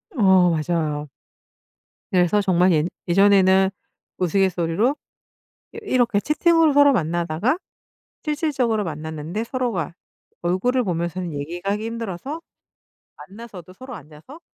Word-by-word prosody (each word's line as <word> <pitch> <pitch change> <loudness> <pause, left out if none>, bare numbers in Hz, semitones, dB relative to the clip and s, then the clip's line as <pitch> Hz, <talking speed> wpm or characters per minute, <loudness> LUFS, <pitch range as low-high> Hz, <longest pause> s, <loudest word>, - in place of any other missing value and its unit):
어 190 -6 +5
맞아요. 155 -2 -2 1.0
그래서 185 +3 +3
정말 185 -2 +3
예 150 -2 +2 0.2
예전에는 190 0 +4 0.5
우스갯소리로 185 - +1 0.8
이 - - -10
이렇게 245 - +1
채팅으로 320 - +3
서로 285 0 +6
만나다가 175 - 0 0.7
실질적으로 280 -8 0
만났는데 160 +5 -5
서로가 230 - -3 0.5
얼굴을 190 +9 +1
보면서는 175 -2 -3
얘기가 170 +7 -4
하기 215 +2 -4
힘들어서 230 - -5 0.8
만나서도 195 -4 -11
서로 255 +3 -10
앉아서 160 - -14
190 Hz, 295 characters per minute, -22 LUFS, 170-240 Hz, 1.0 s, 서로